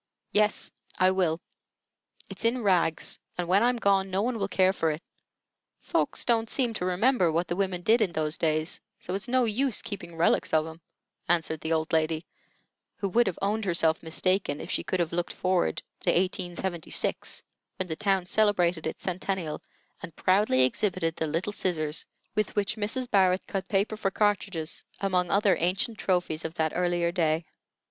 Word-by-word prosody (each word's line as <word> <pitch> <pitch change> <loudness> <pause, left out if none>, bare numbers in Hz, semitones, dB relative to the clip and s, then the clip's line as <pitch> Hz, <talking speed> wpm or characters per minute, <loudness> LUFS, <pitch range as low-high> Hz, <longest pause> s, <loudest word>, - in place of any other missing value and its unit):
"Yes, 210 0 +2 0.3
I 185 0 +4
will. 175 -4 +1 0.9
It's - - -5
in 235 +1 +1
rags, 175 -5 +1 0.2
and 175 -1 -2
when 190 +3 +4
I'm 245 +1 +3
gone 195 -3 +2
no 190 +2 0
one 240 -1 -1
will 195 - 0
care 190 -1 +3
for 165 -4 0
it. 155 0 -2 0.8
Folks - - 0
don't 225 -2 +2
seem 245 -4 +1
to 180 - -3
remember 185 0 +2
what 170 +2 0
the 175 - -2
women 185 -2 -1
did 225 +4 +4
in 190 -6 +1
those 155 0 0
days, 155 0 0 0.2
so 180 - -5
it's 200 +4 -1
no 255 0 +3
use 235 +3 0
keeping 175 -5 -7
relics 165 0 +2
of 155 0 +3
'em," 160 +1 -10 0.5
answered 165 -2 +1
the 160 - -3
old 160 0 0
lady, 160 +1 +1 0.7
who 200 - -2
would 235 +3 +3
have 185 - -2
owned 215 +2 0
herself 165 -3 +2
mistaken 185 0 0
if - - -6
she - - 0
could 185 - -2
have 170 -1 0
looked 175 0 -1
forward 185 - 0 0.2
to - - -1
1876, 180 -1 -1 0.3
when 185 - -2
the 160 - -3
town 195 -1 +1
celebrated 180 -5 +2
its - - -5
centennial, 185 -3 -2 0.4
and 165 - -9
proudly 185 -9 +3
exhibited 165 +2 0
the 160 - -1
little 170 +7 -2
scissors 155 -6 -1 0.3
with 215 -2 -1
which 205 +1 0
Mrs. 225 +4 -2
Barrett 190 -3 +3
cut 195 -1 -4
paper 205 +1 +1
for 215 -2 -1
cartridges, 195 -5 -1 0.2
among 180 -3 +1
other 200 -1 +3
ancient 190 +6 +1
trophies 175 -4 0
of 160 +1 -5
that 160 -1 +1
earlier 175 -1 +1
day. 165 -2 +1
185 Hz, 175 wpm, -28 LUFS, 165-205 Hz, 0.9 s, I